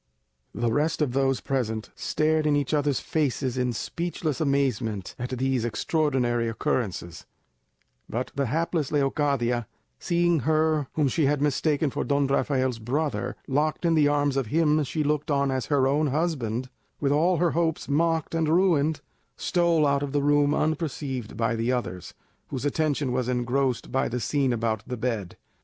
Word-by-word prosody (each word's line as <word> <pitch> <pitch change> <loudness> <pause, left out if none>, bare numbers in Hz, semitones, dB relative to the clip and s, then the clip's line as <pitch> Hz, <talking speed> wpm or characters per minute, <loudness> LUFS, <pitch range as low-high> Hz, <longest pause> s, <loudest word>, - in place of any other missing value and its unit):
The 115 +2 0
rest 155 +6 +1
of 140 - -1
those 135 0 +1
present 110 -6 -2
stared 155 0 0
in 150 - +3
each 145 0 -1
others' 145 -2 +1
faces 135 -4 -1
in 125 -1 0
speechless 160 +3 -3
amazement 125 - 0
at 125 +1 -3
these 130 -1 0
extraordinary 120 -1 0
occurrences; 95 -6 -3 0.8
but 125 +3 -3
the 140 -1 -1
hapless 160 +2 -1
Leocadia, 135 -5 +1 0.3
seeing 175 -1 +2
her 155 0 +1
whom 150 -3 +2
she 140 +2 +1
had 145 0 +1
mistaken 145 +1 +1
for 145 - -2
Don 140 -1 +1
Rafael's 130 -3 0
brother 130 +1 -2
locked 150 +5 0
in 165 - +3
the 150 -2 +4
arms 145 -1 +1
of 135 -4 0
him 155 +2 +2
she 150 +3 -2
looked 150 +1 -1
on 140 -1 +2
as 130 -1 -2
her 140 -3 +3
own 150 +3 +2
husband, 130 -5 -1 0.3
and 140 -2 +1
all 165 +5 +3
her 170 0 +2
hopes 165 -1 0
mocked 160 +2 +1
and 165 -2 +1
ruined, 160 -4 +2 0.4
stole 170 -3 +2
out 140 -1 +2
of 145 -1 -4
the 145 -1 +1
room 145 0 +3
unperceived 145 -7 -2
by 115 +1 +1
the 115 +2 0
others, 95 -8 -4 0.3
whose 130 +1 -4
attention 145 -2 0
was 125 0 -1
engrossed 125 +1 0
by 135 - +1
the 125 - -2
scene 135 +3 +1
about 115 -2 -1
the 125 0 -4
bed. 110 -6 -3
140 Hz, 165 wpm, -26 LUFS, 125-155 Hz, 0.8 s, the